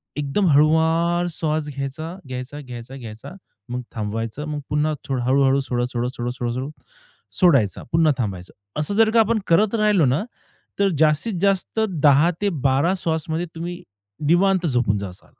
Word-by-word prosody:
एकदम 150 +7 0
हळुवार 160 +4 +3
स्वास 155 -2 -2
घ्यायचा, 155 +5 -5
घ्यायचा, 130 +3 -6
घ्यायचा, 125 0 -9
घ्यायचा 115 -1 -9 0.4
मग 125 +1 -3
थांबवायचं, 115 +5 -4
मग 150 -1 -3
पुन्हा 150 +1 +1 0.3
हळू-हळू 135 +2 +3
सोडा, 125 -2 -1
सोडा, 120 0 -1
सोडा, 120 0 -2
सोडा, 120 -1 -3
सोडा 130 +3 -4 0.7
सोडायचा. 135 - +3
पुन्हा 160 -2 +4
थांबायचं. 95 -7 -4 0.3
असं 155 +7 0
जर 220 0 +5
का 230 - +5
आपण 225 0 +3
करत 200 +6 +3
राहिलो 210 -7 +3
ना, 130 +8 +1 0.6
तर 200 - +3
जास्तीत 155 +8 +2
जास्त 200 +2 +1
10-12 155 -1 +2
श्वासमध्ये 160 +1 -2
तुम्ही 175 +1 -5 0.5
निवांत 185 +2 +3
झोपून 120 -7 +1
जाताल 95 -2 -8
150 Hz, 140 wpm, -22 LUFS, 125-175 Hz, 0.7 s, जर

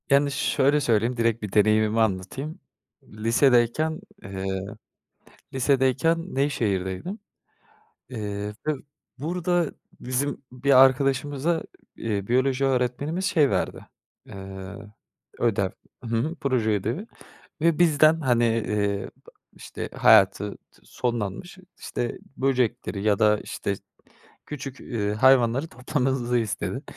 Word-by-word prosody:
Yani, 140 0 +4
şöyle 140 +1 +2
söyleyeyim, 120 0 +1
direkt 115 -1 +1
bir 105 - -4
deneyimimi 110 +1 +3
anlatayım. 110 - -2 0.4
Lisedeyken, 120 - +2 0.2
ııı, 95 +2 -4 0.8
lisedeyken 135 +6 +1
Nevşehir'deydim. 120 - -1 0.9
Eee 105 -3 -4
ve 155 - +3 0.4
burada 175 +2 0 0.3
bizim 135 +3 -2
bir 130 +1 +5
arkadaşımıza, 140 +4 0 0.3
iii, 100 -3 -3
biyoloji 130 +2 +2
öğretmenimiz 135 +7 0
şey 150 -7 +3
verdi, - - -2 0.4
eee, 95 0 -9 0.6
ödev. 100 -5 +1 0.3
Hı - - -7
hı. 155 +9 -1
Proje 130 -6 +1
ödevi 115 - -2 0.6
ve 165 -1 +2
bizden 160 -1 +5
hani, 120 -4 +2
ııı, 100 -1 -1 0.5
işte - - -7
hayatı 105 -1 +4 0.3
sonlanmış 120 - -4 0.2
işte 120 - -4 0.2
böcekleri 125 -6 0
ya 105 -2 +2
da 105 -1 +4
işte 100 - -4 0.7
küçük, 135 -3 -7
ııı, 105 -4 -2
hayvanları 130 +4 +4
toplamamızı 125 -2 -1
istedi. 110 -4 -2
125 Hz, 100 wpm, -25 LUFS, 105-140 Hz, 0.9 s, bir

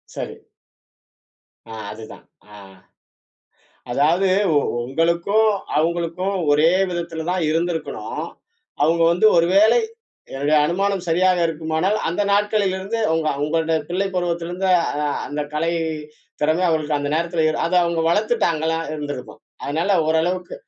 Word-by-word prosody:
சரி. - - -6 1.3
ஆ, - - -7 0.2
அதுதான். 110 0 -11 0.3
ஆ. - - -11 1.4
அதாவது 160 +9 +2 0.6
உங்களுக்கும், 170 - +1 0.3
அவுங்களுக்கும் 170 +4 -1 0.2
ஒரே 150 +2 +4 0.2
விதத்துல 170 -2 -4
தான் 180 -1 0
இருந்திருக்கணும். 165 0 -3 0.6
அவங்க 165 +3 +3
வந்து 180 +5 +3
ஒரு 170 0 +4
வேலை 215 - +5 0.5
என்னுடைய 145 +3 +1
அனுமானம் 195 +3 0
சரியாக 180 +2 +3
இருக்குமானால், 160 +5 -1
அந்த 175 +5 -1
நாட்களிலிருந்து 205 0 0 0.2
உங்க 160 -1 0 0.2
உங்களுடைய 160 +1 0
பிள்ளை 185 +3 -1
பருவத்திலிருந்த 175 +1 -2 0.3
அ, - - -2 0.3
அந்த 150 0 -4
கலை 165 +2 0 0.7
திறமை 155 +4 +2
அவங்களுக்கு 155 -2 0
அந்த 145 0 -3
நேரத்துல, 170 0 0 0.2
அத 175 - -1
அவங்க 170 -1 -1
வளத்துட்டாங்களா 165 -5 +1 0.2
இருந்துருக்கும். 145 -4 -7 0.2
அதனால 160 +7 -1 0.2
ஓரளவுக்கு 175 +3 0
170 Hz, 110 wpm, -21 LUFS, 160-185 Hz, 1.4 s, வேலை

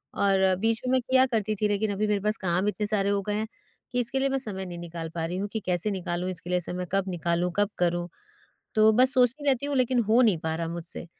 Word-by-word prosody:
और 190 -1 +3
बीच 225 +2 +1
में - - +1
मैं 260 - +4
किया 260 +1 +4
करती 215 -3 -1
थी 210 +1 0
लेकिन 205 +1 0
अभी 205 +2 0
मेरे 210 -1 +1
पास 210 +2 0
काम 185 +1 0
इतने 210 0 -2
सारे 200 -2 +1
हो 200 0 +1
गए 210 - -2
हैं, 215 +1 -2 0.4
कि 250 - 0
इसके 245 +3 -1
लिए 275 +1 +1
मैं 270 - 0
समय 200 -7 -4
नहीं 175 -1 -7
निकाल 170 -1 -6
पा 165 -1 -1
रही 175 +2 -3
हूँ 200 +2 -2
कि 220 - -1
कैसे 180 +3 0
निकालूँ 180 -1 -3
इसके 175 -1 -8
लिए 180 - +2
समय, 180 +1 -5
कब 195 0 0
निकालूँ, 175 0 -1
कब 205 0 +2
करूँ? 175 0 +1 0.7
तो 215 0 +6
बस 255 +4 +5
सोचती 255 +3 +2
रहती 270 0 +1
हूँ 285 -1 -1
लेकिन 255 -1 +2
हो 230 +3 +5
नहीं 210 -8 +3
पा 160 0 -3
रहा 165 0 -3
मुझसे, 170 0 -6
200 Hz, 255 wpm, -27 LUFS, 180-225 Hz, 0.7 s, तो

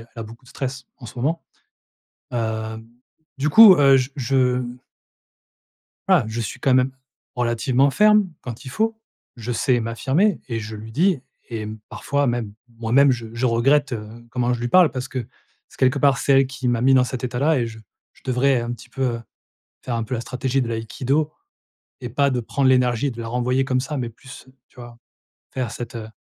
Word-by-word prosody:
elle 115 - -14
a - - -3
beaucoup 115 +4 -13
de 125 - -17
stress 130 -1 -5
en 120 - -10
ce - - -12
moment, 160 +6 -1 0.9
heu, 110 -1 -3 0.5
du 145 +3 0
coup, 215 +2 +9
heu, 135 -3 +6
j 130 +2 -1
je 130 -1 +1
mmh 120 0 -6 1.3
voilà, 180 - +4
je 115 +1 -3
suis - - -5
quand 130 - +2
même 130 +1 +3 0.4
relativement 125 +3 +2
ferme, 210 0 +4
quand 120 +2 -8
il - - -6
faut. 220 - -1 0.4
Je 120 +1 -5
sais 120 +1 +1
m'affirmer 135 - +1
et 115 -2 -3
je 110 0 -7
lui 110 +1 -9
dis 165 - +2 0.3
et 110 -2 -4 0.2
parfois 140 -1 -1
même, 120 -4 -2 0.3
moi-même 130 +5 +4
je 120 -2 -3
je 120 +2 -1
regrette, 135 +4 +2
heu, 105 -2 -5 0.2
comment 125 0 0
je 120 - -3
lui 120 - -2
parle 180 +4 +6
parce 130 0 -4
que 130 -3 -4 0.4
c'est - - -19
quelque 130 +2 +2
part 140 -2 +4
c'est 140 - +2
elle 135 -1 +5
qui 130 -1 -5
m'a 120 -1 +1
mis 135 +1 +4
dans 130 -1 +5
cet 125 0 -5
état-là 135 +5 +1
et 120 - 0
je 110 -1 -10 0.3
je - - -24
devrais 130 0 +2
un 120 +1 -4
petit 125 +1 -13
peu, 135 +2 -4
heu, 120 -2 -1 0.6
faire 120 -2 -3
un 115 - -1
peu 115 - -5
la 120 - -2
stratégie 130 +1 -1
de 120 - -2
l'Aïkido 130 +7 -1 0.7
et 125 - -4
pas 140 +4 +2
de 125 -2 -1
prendre 130 +3 0
l'énergie 125 0 +2
et - - -2
de 120 - -10
la 115 - -5
renvoyer 125 +2 0
comme 130 -1 +1
ça 145 +2 -4
mais 120 -2 -3
plus 130 +3 -14 0.2
tu - - -30
vois? 120 -1 -11 0.5
Faire 125 -4 -3
cette, 120 +1 -7
heu, 110 -1 -6
125 Hz, 205 wpm, -22 LUFS, 115-135 Hz, 1.3 s, coup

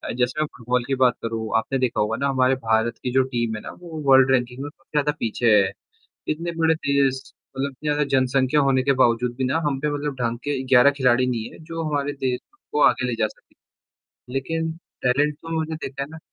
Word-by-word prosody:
जैसे 125 +4 0
मैं - - +2
फुटबॉल 125 0 0
की 135 - 0
बात 125 -2 +4
करूँ, 115 -1 -3
आपने 130 +4 -1
देखा 125 -2 0
होगा 105 +2 0
ना 140 - 0
हमारे 130 0 +3
भारत 115 -1 0
की 125 - -1
जो 130 0 +4
टीम 120 -4 -2
है 105 - -6
ना - - -8
वो 160 -3 -7
वर्ल्ड 135 0 +7
रैंकिंग 125 0 0
में 145 - -5
सबसे - - -27
ज़्यादा 150 0 +2
पीछे 115 0 +1
है। 95 -1 +3 0.6
इतने 165 +3 -2
बड़े 160 0 +3
देश 140 -3 +1 0.4
मतलब 140 +1 -1
इतनी 150 +3 -5
ज़्यादा 150 0 +2
जनसंख्या 130 +2 +2
होने 135 -2 +2
के 140 - +3
बावजूद 120 +1 +2
भी 135 - -1
ना 130 +4 +1
हम 135 -2 0
पे 150 +2 0
मतलब 145 -1 -3
ढंग 120 0 -1
के 145 -2 -1
11 130 +2 +6
खिलाड़ी 130 -3 +2
नहीं 115 -3 -2
है, - - -14
जो 165 0 -5
हमारे 145 -1 -1
देश 130 -3 -2 0.3
को 150 - 0
आगे 125 - -1
ले 120 - -1
जा 110 - +1
सके। - - -21 0.8
लेकिन 160 +4 -2 0.3
टैलेंट 140 +4 +2
तो 165 +2 -5
मैंने 160 0 -3
देखा 135 +1 -5
है 140 - -5
ना 160 - -9
130 Hz, 225 wpm, -23 LUFS, 125-145 Hz, 0.8 s, वर्ल्ड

